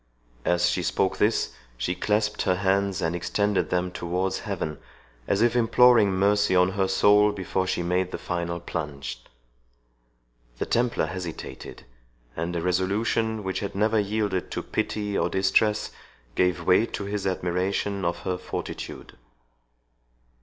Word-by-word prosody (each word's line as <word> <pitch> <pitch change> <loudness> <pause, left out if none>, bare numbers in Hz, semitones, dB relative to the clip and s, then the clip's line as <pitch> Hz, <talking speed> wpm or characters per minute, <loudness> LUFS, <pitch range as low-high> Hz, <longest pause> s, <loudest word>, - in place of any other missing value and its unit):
As 90 0 +3
she 90 - 0
spoke 95 +2 0
this, 110 +2 +1 0.2
she 75 +9 -1
clasped 105 +2 0
her 90 -2 +2
hands 95 0 +1
and 80 +1 0
extended 100 +3 0
them 90 0 0
towards 90 +2 -2
heaven, 75 -1 -4 0.5
as 100 +3 +2
if 120 0 +3
imploring 120 -2 +5
mercy 100 +1 +2
on 90 0 +5
her 95 0 0
soul 105 +2 +5
before 95 -1 -2
she 90 -2 -1
made 90 +1 0
the - - -3
final 85 -1 -3
plunge. 75 -7 -5 1.4
The - - -2
Templar 120 -6 +1
hesitated, 85 +1 -7 0.5
and 85 +2 -3
a 85 - -2
resolution 105 +4 0
which 95 0 -2
had 100 - -5
never 110 +2 +2
yielded 105 -2 -1
to - - -4
pity 105 -1 -2
or - - +1
distress, 105 +3 +2 0.4
gave 90 -2 +1
way 95 +5 +4
to - - -5
his 100 0 -2
admiration 95 +2 -1
of 85 0 -1
her 90 -1 -2
fortitude. - - -7
95 Hz, 140 wpm, -26 LUFS, 90-105 Hz, 1.4 s, imploring